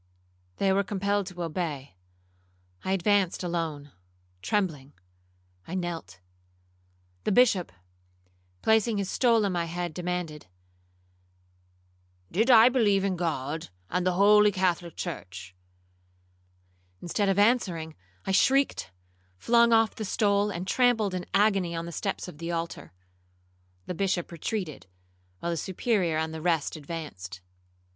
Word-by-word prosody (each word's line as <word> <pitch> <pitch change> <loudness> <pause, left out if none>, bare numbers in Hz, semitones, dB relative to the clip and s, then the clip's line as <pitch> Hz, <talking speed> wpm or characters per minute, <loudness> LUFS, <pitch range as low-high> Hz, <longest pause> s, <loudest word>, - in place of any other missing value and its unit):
They 195 -1 +2
were 200 +1 +2
compelled 200 0 -1
to 180 -2 -6
obey. 155 - -4 0.9
I 190 - 0
advanced 195 -1 +1
alone, 160 -5 -3 0.5
trembling. 150 - -1 0.7
I 180 - -5
knelt. 165 - -5 1.0
The - - 0
Bishop, 205 -5 +3 0.9
placing 220 0 +3
his 200 -1 -2
stole 230 -4 +3
on 200 - 0
my 175 -2 -1
head, 175 0 -4
demanded, 180 - -4 1.8
'Did 220 +8 +1
I 230 -2 +9
believe 215 -6 +3
in 195 -2 0
God, 155 - -3 0.2
and 180 +1 0
the 185 0 +1
holy 210 +2 +6
Catholic 180 -3 -1
church?' 95 - -7 1.5
Instead 195 +3 -1
of 195 - +1
answering, 195 -8 +2 0.3
I - - -1
shrieked, 270 +8 +2 0.5
flung 235 - +4
off 225 -1 +4
the 220 - -6
stole, 205 0 +1
and 185 -2 -4
trampled 225 -3 +2
in 180 -1 -4
agony 195 -4 +2
on 165 0 -3
the 170 - -6
steps 195 +3 -3
of 155 -4 -11
the 170 +1 -4
altar. 165 - -4 0.9
The - - -4
Bishop 185 -1 -1
retreated, 170 - -4 0.5
while 170 - -2
the 170 - -2
Superior 185 -2 0
and 160 0 -2
the 160 - -6
rest 165 -3 0
advanced. 145 - -7
180 Hz, 125 wpm, -27 LUFS, 165-205 Hz, 1.8 s, I